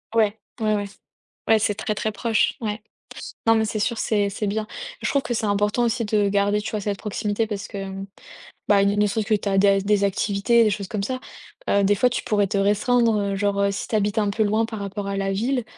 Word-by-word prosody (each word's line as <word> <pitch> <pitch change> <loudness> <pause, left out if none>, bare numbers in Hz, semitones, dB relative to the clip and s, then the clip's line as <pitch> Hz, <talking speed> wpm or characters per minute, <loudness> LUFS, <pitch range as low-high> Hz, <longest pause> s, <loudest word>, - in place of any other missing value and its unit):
Ouais, 215 -1 +3 0.2
ouais, 215 -1 +1
ouais, 205 0 -2 0.6
ouais, 220 -1 +6
c'est 210 -1 +1
très, 215 - -2
très 220 - -2
proche, 220 +1 +1
ouais. 215 -1 -3 0.7
Non 225 - +6
mais 220 0 +2
c'est 215 0 -3
sûr 230 +2 0
c'est 205 -3 +1
c'est 205 +2 -3
bien. 215 +1 -2 0.3
Je - - -1
trouve 280 - +2
que 240 - -3
c'est 220 - -1
important 205 +3 +1
aussi 235 0 0
de 210 -1 +2
garder, 205 +1 +1
tu - - -5
vois 210 -2 -2
cette 200 -1 -2
proximité 210 +1 -2
parce 205 -2 -5
que, 195 -2 -6
mmh, 195 0 -6 0.6
bah, 200 -1 +5
il 200 +1 +2
ne 210 - +4
serait-ce 210 +1 -1
que 220 - +2
tu 205 - -4
as 195 - +1
des 195 0 +5
des 200 0 +2
activités, 200 +4 +2
des 215 - +3
choses 200 -1 -3
comme 205 -2 -2
ça. 255 +4 -3 0.5
Heu, 200 0 +3
des 205 +1 +3
fois 250 +5 +3
tu 240 - -3
pourrais 205 -2 +1
te 200 - -2
restreindre, 220 +3 +2
heu, 200 -1 -1
genre, 200 0 0
heu, 200 0 +2
si 195 - -4
tu 220 - -2
habites 205 +1 0
un 205 -1 +1
peu 220 +2 +1
loin 215 +2 +1
par 220 -2 -7
rapport 200 0 -5
à 200 - -2
la 195 0 -1
ville, 245 +5 0
210 Hz, 250 wpm, -23 LUFS, 200-220 Hz, 0.7 s, ouais